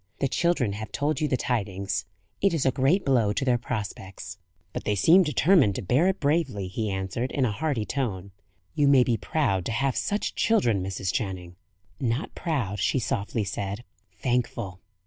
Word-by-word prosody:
The 135 - +2
children 140 - +1
have 105 0 -6
told 150 +6 -1
you 155 - +2
the 130 - +1
tidings. 100 -6 -2 0.4
It 195 -3 +3
is 150 - 0
a 130 - +4
great 140 +9 +2
blow 115 -6 +3
to 135 - -1
their 125 -2 +2
prospects." 100 -5 -6 0.3
"But - - -4
they 105 - 0
seem 165 - +6
determined 150 - +4
to - - -4
bear 130 - +3
it 190 0 0
bravely," 140 - 0
he 110 +3 -3
answered, 95 +6 -3
in 135 - +1
a 115 - 0
hearty 135 -2 -1
tone. 100 -9 -3 0.4
"You 145 -2 +2
may 135 -2 +6
be 120 -1 +1
proud 110 - 0
to - - -2
have 135 +3 0
such 205 +1 -1
children, 120 - +2
Mrs. 95 -1 -3
Channing." 95 -7 -3 0.4
"Not 125 +2 -1
proud," 125 - -2
she 100 - +1
softly 110 -2 -1
said. 100 +2 -4 0.4
"Thankful!" 120 -7 -1
120 Hz, 180 wpm, -26 LUFS, 100-140 Hz, 0.4 s, seem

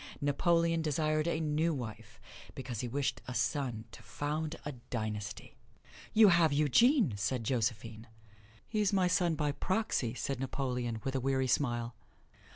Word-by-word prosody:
Napoleon 165 +3 +2
desired 155 0 0
a 165 -2 0
new 155 +1 +1
wife, 115 -4 -8 0.4
because 125 -4 -5
he 125 - -2
wished 135 -1 -2
a 125 - -5
son 125 -7 -1
to - - -12
found 150 +2 -3
a 145 - -3 0.2
dynasty. 110 -3 -5 0.5
"You 215 -2 +7
have 170 -4 +4
Eugene!" 155 - +4
said 115 +4 -1
Josephine. 115 -1 -2 0.6
"He's 210 -2 +1
my 190 -3 +3
son 175 -2 +2
by 150 -1 0
proxy," 185 - -1
said 135 0 -3
Napoleon, 125 -4 -2
with 135 - -2
a 135 - 0
weary 130 0 +1
smile. 120 -3 0
140 Hz, 145 wpm, -32 LUFS, 120-160 Hz, 0.6 s, You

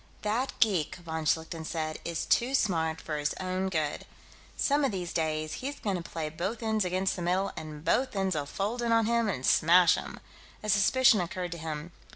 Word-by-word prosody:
"That 230 +6 0
geek," 190 -10 +2
von 160 -2 -5
Schlichten 160 +1 0
said, 155 -1 -3
"is 170 -2 -3
too 255 +3 +2
smart 160 -8 +1
for 155 -2 -4
his 150 0 -1
own 185 0 -2
good. 155 -5 -2 0.5
Some 285 +1 +2
of 275 - +2
these 180 -3 -4
days 155 -1 -1
he's 280 +2 -4
going 200 -3 -1
to 175 - -3
play 165 -1 -4
both 190 +9 -4
ends 220 -1 +1
against 185 +1 0
the 180 - -5
middle 185 +3 0
and 155 -1 -8
both 255 -3 +1
ends'll 190 -7 0
fold 210 +9 -2
in 235 -1 0
on 230 -1 +4
him 235 -1 +2
and 130 -9 -3
smash 170 +1 +6
him." - - -5 0.4
A 215 - -3
suspicion 215 +2 +5
occurred 175 0 -4
to 170 - -5
him. 155 +1 -5
180 Hz, 200 wpm, -29 LUFS, 160-215 Hz, 0.5 s, smash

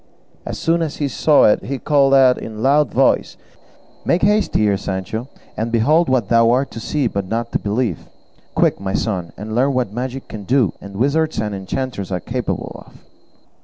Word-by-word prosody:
As - - -4
soon 170 +1 +1
as 160 -3 -3
he 145 - -1
saw 145 +3 +3
it 105 - +4
he 135 +1 -3
called 140 0 +3
out 130 -2 +5
in 110 - -7
a - - -8
loud 140 +2 +3
voice, - - +1 0.7
"Make 170 - +1
haste 210 +1 +2
here, 105 -2 +3
Sancho, 100 +5 -4 0.3
and 115 +2 -3
behold 150 +9 +3
what 125 -6 +1
thou 115 +1 +4
art 130 +3 +1
to 115 - -7
see 145 +4 -1
but 100 -4 -2
not 115 +3 -3
to - - 0
believe; 105 -4 -2 0.5
quick, - - +2
my 95 0 -3
son, 90 -7 -2
and 110 +2 -6
learn 130 +4 +2
what 125 -6 -1
magic 130 +3 -5
can 105 -2 -8
do, 120 -4 +2
and 100 0 -10
wizards 155 +8 0
and 105 -1 -2
enchanters 100 +1 -4
are 90 - -1
capable 120 +7 -4
of." - - -19
120 Hz, 195 wpm, -19 LUFS, 105-135 Hz, 0.7 s, out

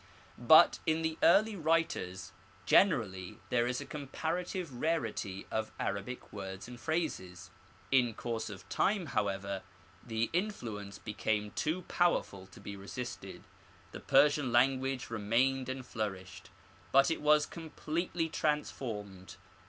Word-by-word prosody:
But - - +7
in 160 0 +2
the 160 0 -2
early 215 +5 +5
writers 160 - 0 0.3
generally 100 - +3
there 120 -1 +3
is 125 0 -1
a - - -6
comparative 160 +3 -3
rarity 115 - -1
of 110 0 -2
Arabic 100 +5 -4
words 95 -1 -6
and 120 0 -10
phrases. 95 - -3 0.4
In 125 -4 +3
course 115 -2 -3
of 95 -2 -10
time, 200 -3 +1
however, 100 -5 -2 0.4
the 115 0 -1
influence 115 - -3
became 105 0 -2
too 165 - -1
powerful 100 - 0
to 95 - -15
be 100 - -7
resisted. 100 +5 -7 0.5
The - - -7
Persian 145 -3 +4
lan 130 +2 +4
guage 130 -3 -3
remained 125 +5 +1
and 130 -1 -4
flourished, 95 -5 -5 0.4
but 135 +3 +5
it 165 - -1
was 150 0 +5
completely 165 +1 -3
trans 150 -2 0
formed. 100 -6 -7
125 Hz, 130 wpm, -32 LUFS, 100-155 Hz, 0.5 s, But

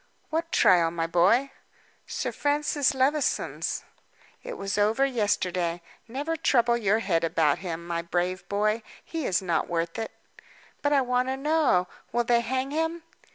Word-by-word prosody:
"What 330 +1 -1
trial, 170 -3 +5
my 165 0 -2
boy?" 195 +11 +3 0.6
"Sir - - -3
Francis 290 -1 +1
Levison's." 275 +3 0 0.6
"It - - -7
was 195 0 -3
over 215 +6 +3
yesterday. 180 -8 0 0.2
Never 285 +7 -3
trouble 240 -6 +3
your 215 -2 +2
head 170 -7 0
about 160 -3 +2
him, 170 -2 -5
my 170 -1 -2
brave 175 +1 -2
boy, 215 +2 +1 0.2
he 325 -4 -3
is 185 0 +1
not 170 -3 0
worth 165 +1 -2
it." 225 - -3 0.7
"But 290 - +1
I 280 -2 +4
want 250 0 +1
to 265 0 -1
know. 280 - +2 0.2
Will 240 +2 +1
they 235 0 +3
hang 260 +3 -2
him?" 325 +2 -1
225 Hz, 155 wpm, -27 LUFS, 175-275 Hz, 0.7 s, trial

